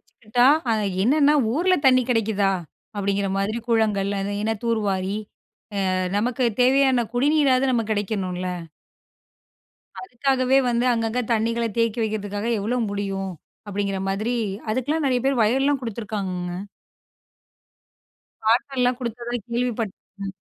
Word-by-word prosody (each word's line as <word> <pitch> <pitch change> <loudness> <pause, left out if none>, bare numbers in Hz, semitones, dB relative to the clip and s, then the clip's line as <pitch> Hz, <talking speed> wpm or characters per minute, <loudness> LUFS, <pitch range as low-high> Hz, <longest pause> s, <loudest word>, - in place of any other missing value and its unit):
வச்சுக்கிட்டா 240 +3 0 0.2
அ - - +4 0.3
என்னன்னா, 290 +5 +4 0.2
ஊர்ல 360 +7 +3
தண்ணி 255 -1 +6
கிடைக்குதா? 220 -4 +2 0.5
அப்டிங்கற 200 0 0
மாதிரி 210 +4 -1
குளங்கள் 210 -4 +2
அது 200 +1 -3
என்ன 225 - +1
தூர்வாரி 200 -4 0 0.7
அ - - 0 0.2
நமக்கு 245 +4 0 0.2
தேவையான 260 -1 +4
குடிநீராவது 270 -1 +3
நமக்கு 225 -2 0
கிடைக்கணுல. 190 -3 -2 1.6
அதுக்காகவே 265 -2 +1
வந்து 240 +1 +1
அங்கங்க 230 +1 -1
தண்ணிகள 230 +1 0
தேக்கி 230 0 +1
வைக்குறதுக்காக 205 0 -3
எவ்ளோ 225 +5 -1
முடியும்? 195 -1 -3 0.4
அப்டிங்கற 200 -1 -2
மாதிரி 215 +5 -1 0.3
அதுக்கெல்லாம் 285 +7 0
நிறைய 250 -1 +2
பேர் 270 -2 +2
வயல்லாம் 270 +5 +2
குடுத்துருக்காங்கங்க. 200 -6 -4 1.9
காட்டலாம் 250 +2 +2
குடுத்ததா 240 0 -5
கேள்விப்பட் 235 -3 -2 0.3
ம். 195 -1 -4
230 Hz, 110 wpm, -23 LUFS, 205-250 Hz, 1.9 s, தண்ணி